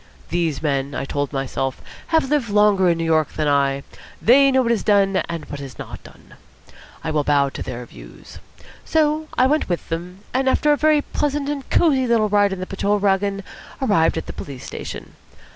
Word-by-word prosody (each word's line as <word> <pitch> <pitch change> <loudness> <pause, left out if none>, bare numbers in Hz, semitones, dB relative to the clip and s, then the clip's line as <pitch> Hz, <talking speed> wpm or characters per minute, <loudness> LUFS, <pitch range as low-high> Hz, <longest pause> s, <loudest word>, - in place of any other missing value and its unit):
These 165 -4 -1
men, 140 -1 -1
I - - -3
told 145 0 -2
myself, 135 -1 -3 0.3
have 320 -4 +2
lived 285 -7 +1
longer 205 -3 +4
in 170 - +2
New 165 - -2
York 160 -2 +1
than 155 - -1
I. 140 -1 +1 0.4
They 275 +4 +5
know 260 -1 +3
what 235 - +1
is 230 - +1
done 200 -2 +3
and 170 -2 -5
what 145 - -7
is 135 -2 -9
not - - -9
done. - - -17 0.7
I 160 - -2
will 150 -1 +1
bow 140 -1 +2
to - - -8
their 125 0 -6
views. - - -13 0.4
So 310 0 +1
I 255 - +5
went 300 -2 +1
with 175 - -3
them, 175 +3 -5
and 265 +1 +2
after 295 +3 +2
a - - +5
very 305 0 +3
pleasant 290 -1 -2
and 280 -3 -5
cosy 270 -6 +3
little 225 -3 +2
ride 205 -1 +3
in 190 - -4
the 185 - -4
patrol 200 +2 0
waggon, 200 0 0 0.4
arrived 205 -12 +2
at 160 - -3
the - - -7
police 135 -3 -8
station. - - -7
195 Hz, 200 wpm, -21 LUFS, -, 0.7 s, They